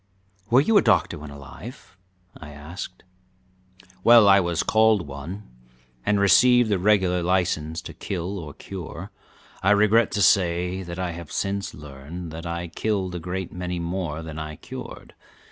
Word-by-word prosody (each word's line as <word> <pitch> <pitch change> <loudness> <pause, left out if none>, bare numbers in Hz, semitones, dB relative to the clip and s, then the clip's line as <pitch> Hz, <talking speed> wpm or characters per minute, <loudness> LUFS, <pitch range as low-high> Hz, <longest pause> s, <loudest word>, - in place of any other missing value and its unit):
"Were 125 +3 +6
you 210 +8 +3
a - - +3
doctor 90 -6 +2
when 75 0 -9
alive?" 80 - -11 0.4
I 80 - -11
asked. 75 +6 -9 1.0
"Well, 115 -3 +8
I 100 0 +7
was 85 -3 0
called 110 -4 +3
one, 70 +9 -7 0.6
and 105 -1 +1
received 120 +4 +5
the 100 - +2
regular 95 -2 +2
license 85 -3 0
to - - -8
kill 95 0 -4
or 75 -4 -9
cure. 95 -4 -8 0.5
I 95 - +2
regret 105 +2 +4
to 100 - +2
say 90 0 +2
that 85 -1 -7
I 90 -1 -2
have 85 -2 -9
since 100 0 -2
learned 75 +4 -9
that 80 +1 -7
I 85 0 -4
killed 95 0 -2
a 90 - -4
great 90 +2 -5
many 90 0 -4
more 85 -2 -3
than 80 -1 -7
I 75 0 -6
cured. - - -10
90 Hz, 160 wpm, -24 LUFS, 80-100 Hz, 1.0 s, Well